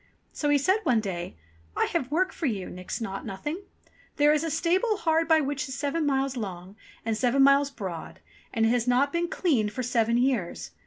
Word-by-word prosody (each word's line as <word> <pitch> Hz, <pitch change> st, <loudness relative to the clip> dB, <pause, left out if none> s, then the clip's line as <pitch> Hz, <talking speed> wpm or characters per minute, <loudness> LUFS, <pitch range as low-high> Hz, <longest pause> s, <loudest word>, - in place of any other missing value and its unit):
So 295 Hz, -, -1 dB
he 290 Hz, -, +5 dB
said 375 Hz, +10 st, +2 dB
one 245 Hz, -, +2 dB
day, 180 Hz, -, -4 dB, 0.4 s
"I -, -, +3 dB
have 275 Hz, -7 st, 0 dB
work 370 Hz, +6 st, +1 dB
for 320 Hz, -, -2 dB
you. 200 Hz, -7 st, -3 dB
Nix 180 Hz, 0 st, -6 dB
Naught 195 Hz, -3 st, -4 dB
Nothing! 295 Hz, -, -5 dB, 0.5 s
There 295 Hz, +1 st, +5 dB
is 305 Hz, +1 st, +1 dB
a 325 Hz, -, -1 dB
stable 360 Hz, +7 st, +1 dB
hard 325 Hz, -4 st, +1 dB
by 320 Hz, -1 st, +5 dB
which 285 Hz, 0 st, -2 dB
is 265 Hz, -, -4 dB
seven 290 Hz, +2 st, -1 dB
miles 270 Hz, -1 st, 0 dB
long, 190 Hz, -4 st, -6 dB, 0.3 s
and 225 Hz, -1 st, 0 dB
seven 255 Hz, +4 st, +3 dB
miles 275 Hz, +1 st, +5 dB
broad, 190 Hz, -, -7 dB, 0.3 s
and 225 Hz, -1 st, +1 dB
it -, -, +4 dB
has 240 Hz, 0 st, +1 dB
not 260 Hz, +3 st, +2 dB
been 340 Hz, 0 st, 0 dB
cleaned 255 Hz, -, +1 dB
for 255 Hz, -, -3 dB
seven 235 Hz, -1 st, +1 dB
years. 245 Hz, -8 st, -1 dB
270 Hz, 205 wpm, -27 LUFS, 225-310 Hz, 0.5 s, he